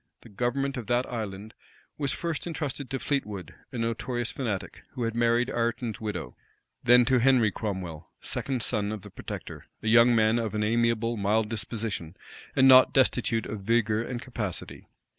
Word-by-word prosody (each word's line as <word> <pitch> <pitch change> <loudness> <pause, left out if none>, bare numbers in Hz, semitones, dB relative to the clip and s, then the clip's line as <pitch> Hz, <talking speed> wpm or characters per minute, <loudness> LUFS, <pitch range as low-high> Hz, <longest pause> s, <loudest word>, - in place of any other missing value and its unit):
The - - -13
government 130 +6 -1
of 120 - -6
that 125 +1 +2
island 105 -1 -5 0.4
was 140 -3 -1
first 170 -1 -3
intrusted 145 -5 -4
to 135 - -2
Fleetwood, 105 - -3 0.2
a 125 - -6
notorious 115 +1 -2
fanatic, 110 -8 -4
who 125 -4 -3
had 115 -1 -1
married 120 +1 +2
Ireton's 115 -1 -2
widow; 100 - -4 0.5
then 120 0 +6
to 130 0 +3
Henry 120 -4 +4
Cromwell, 95 -8 -5
second 130 -4 -3
son 105 -3 0
of 110 -3 -6
the - - -11
protector, - - -8 0.2
a - - -3
young 115 +2 +6
man 110 +1 +3
of 110 -2 -3
an 105 - 0
amiable, 115 +1 +1
mild 105 +2 +1
disposition, 105 -5 -4 0.4
and 130 - +6
not 130 -1 +8
destitute 120 -3 +2
of 105 - -5
vigor 110 +1 +2
and 120 +1 -4
capacity. 110 -7 -5
115 Hz, 165 wpm, -27 LUFS, 105-125 Hz, 0.5 s, not